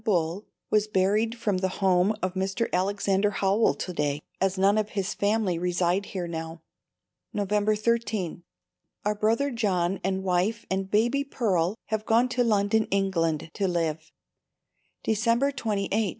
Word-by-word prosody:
Bull 180 -2 0 0.2
was 210 0 +3
buried 210 +4 +1
from 205 -5 0
the 190 - +1
home 190 +1 +3
of 185 -1 0
Mr. 195 +4 -1
Alexander 195 +2 +1
Howell 200 +2 +2
to 180 - -5
day, 145 -2 -1 0.2
as 195 0 +1
none 200 +3 +4
of 215 0 -2
his 195 -1 -1
family 200 -4 0
reside 180 +2 0
here 180 -3 -4
now. 165 -1 -6 0.7
November 210 +1 +1
13. 215 -6 -1 0.6
Our 210 - +2
brother 225 +7 +1
John 195 -6 0
and 190 +1 -1
wife 190 +5 0
and 190 0 -1
baby 235 +7 +2
Pearl 200 -9 0
have 220 -1 -2
gone 235 +3 +4
to 250 0 +1
London, 215 -1 +2
England, 165 -6 0
to 200 -2 0
live. 160 -3 -2 0.9
December 230 +5 +2
28. 215 -7 -2
200 Hz, 145 wpm, -26 LUFS, 180-220 Hz, 0.9 s, none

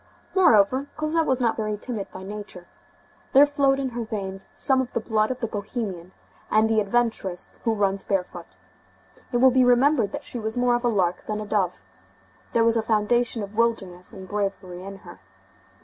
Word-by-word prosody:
Moreover, 260 - +4
Cosette 310 +1 0
was 260 -1 +2
not 235 -3 +1
very 215 -1 -2
timid 215 -3 -5
by 185 - -9
nature. 200 -3 -7 0.7
There 280 +1 +8
flowed 280 -2 +2
in 270 -1 -1
her 240 -1 -4
veins 195 -3 -5
some 265 -2 +2
of 250 - -6
the - - 0
blood 215 -1 0
of 255 -1 -4
the - - +1
bohemian 200 -4 -5 0.4
and 215 +1 +4
the 220 -1 +2
adventuress 205 -4 -1
who 225 -1 +2
runs 195 -1 0
barefoot. 180 -3 -3 0.8
It 245 - +1
will 260 +1 +6
be 255 0 +4
remembered 245 -1 +4
that 290 0 -5
she 245 - -6
was 220 +1 -4
more 245 0 +3
of 240 +1 0
a - - +2
lark 185 -5 0
than 215 0 -3
a 215 - -5
dove. 190 - -1 0.7
There 230 - +4
was 230 0 +3
a - - +2
foundation 225 +1 +1
of 200 +1 -8
wildness 195 -6 -1
and 190 -1 -10
bravery 195 -3 -3
in 195 0 -8
her. 90 - -12
220 Hz, 190 wpm, -24 LUFS, 195-245 Hz, 0.8 s, There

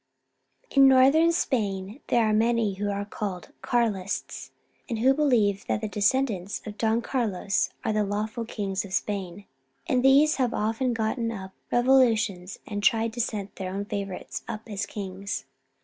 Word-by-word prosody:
In 275 -1 +7
Northern 275 +6 +6
Spain 210 - -1
there 235 -2 +3
are 215 - +2
many 225 -1 +2
who 205 +2 -3
are 200 0 -2
called 200 -3 -5
Carlists, 215 -5 -1 0.4
and 230 - -2
who 260 +4 +4
believe 235 -9 +2
that - - 0
the 215 - -2
de 210 - -6
scendants 205 -4 0
of 210 -1 -7
Don 225 +1 +1
Carlos 205 -6 0 0.2
are 220 - +1
the 215 0 +2
lawful 215 +3 -3
kings 200 -4 -3
of 195 -2 -9
Spain, 200 -1 -3 0.4
and 250 - +2
these 280 +4 +5
have 250 -3 0
often 225 +4 0
gotten 230 +1 -1
up 190 -4 -7 0.2
revo 260 +2 +5
lutions 200 -4 -3
and 205 -1 -4
tried 225 +2 +2
to 240 - -1
set 205 -3 -4
their 185 -1 -4
own 200 +1 -3
favourites 200 -3 -5
up 215 +2 -6
as 205 -3 -4
kings. 200 0 -5
215 Hz, 165 wpm, -26 LUFS, 200-240 Hz, 0.4 s, In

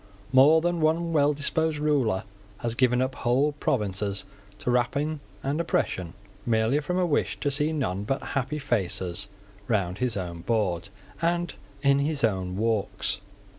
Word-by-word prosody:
More 145 +5 +7
than 175 0 0
one 165 +2 +2
well 145 -1 +4
disposed 150 +2 0
ruler 140 -10 +1 0.3
has 120 0 -1
given 125 +1 +3
up 130 0 -2
whole 130 +5 +2
provinces 105 -8 -1 0.3
to 125 - -1
rapine 140 +5 +1 0.2
and 145 +4 0
oppression, 90 - -1 0.3
merely 115 +3 +2
from 180 +5 -2
a 185 - +3
wish 150 -4 0
to 145 - 0
see 150 +2 +1
none 100 - -1
but 135 +5 -2
happy 140 +3 -1
faces 95 - -1 0.4
round 95 -4 0
his 125 -4 0
own 85 -3 -4
board 95 -4 0 0.3
and 175 0 +1 0.3
in 140 0 +5
his 145 -1 0
own 95 -4 0
walks. 110 -2 0
130 Hz, 150 wpm, -27 LUFS, 105-150 Hz, 0.4 s, More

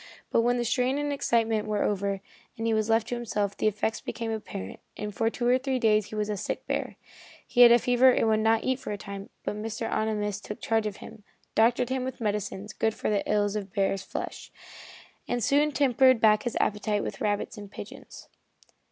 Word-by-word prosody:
But - - +4
when 245 +1 +2
the 240 - -1
strain 250 +3 +1
and 290 0 -1
excitement 225 -5 +1
were 210 -1 0
over, 200 -1 -1 0.4
and 225 - -3
he 225 - +2
was 215 0 0
left 225 0 +2
to 245 - -1
himself, 210 -4 -2
the - - 0
effects 215 +1 -1
became 230 -1 -4
apparent, 185 - -6 0.2
and 210 0 -5
for 225 +4 +1
two 240 +1 -2
or 250 +1 +4
three 265 0 -1
days 215 -3 +3
he - - -8
was 210 -1 -1
a 210 - -2
sick 195 - -4
bear. - - -2 0.5
He 245 - +2
had 240 -1 +10
a 240 - +8
fever 245 +2 +4
and 245 - +3
would 215 -1 +3
not 225 +1 +2
eat 260 0 0
for - - -6
a 205 - -3
time, 200 0 -8
but - - -3
Mr. 225 +1 -4
Ohnimus 210 -2 -1
took 210 - -7
charge 225 -1 0
of 205 - -6
him, 220 -2 -13 0.3
doctored 235 +2 +3
him 260 -1 -1
with 260 0 -5
medicines 210 -2 -3
good 220 0 0
for - - -2
the 205 - +2
ills 205 -1 +1
of 200 -2 -4
bear 195 0 +1
flesh, 190 - -6 0.8
and 245 -1 -1
soon 290 +4 +3
tempted 260 -3 +4
back 215 -1 +5
his 240 - -2
appetite 210 0 0
with - - -6
rabbits 205 +2 -1
and 205 -2 -9
pigeons. - - -10
220 Hz, 215 wpm, -27 LUFS, 210-240 Hz, 0.8 s, had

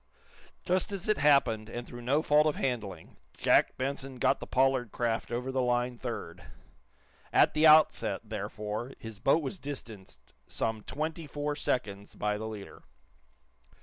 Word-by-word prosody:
Just 185 +3 +1
as 195 -1 -4
it 215 - +2
happened, 125 -7 +3
and 120 +1 -6
through 120 0 -9
no 140 +6 +1
fault 150 0 +4
of 150 - +1
handling, 105 -10 -4 0.2
Jack - - +3
Benson 135 0 -3
got - - +2
the - - -8
Pollard 130 -3 +2
craft 115 -2 -1
over 125 +2 -2
the 130 0 0
line 125 0 0
third. 115 -9 -6 0.9
At - - +5
the 155 +1 +5
outset, 155 0 +5
therefore, 105 +5 -5
his 110 -2 -9
boat 145 +8 +3
was 160 +7 -4
distanced 115 -9 -9
some 110 -1 -2
twenty 155 +5 -4
four 145 0 -3
seconds 100 -8 -2
by 105 0 -1
the 110 - -4
leader. 105 -3 -9
125 Hz, 150 wpm, -30 LUFS, 110-145 Hz, 0.9 s, At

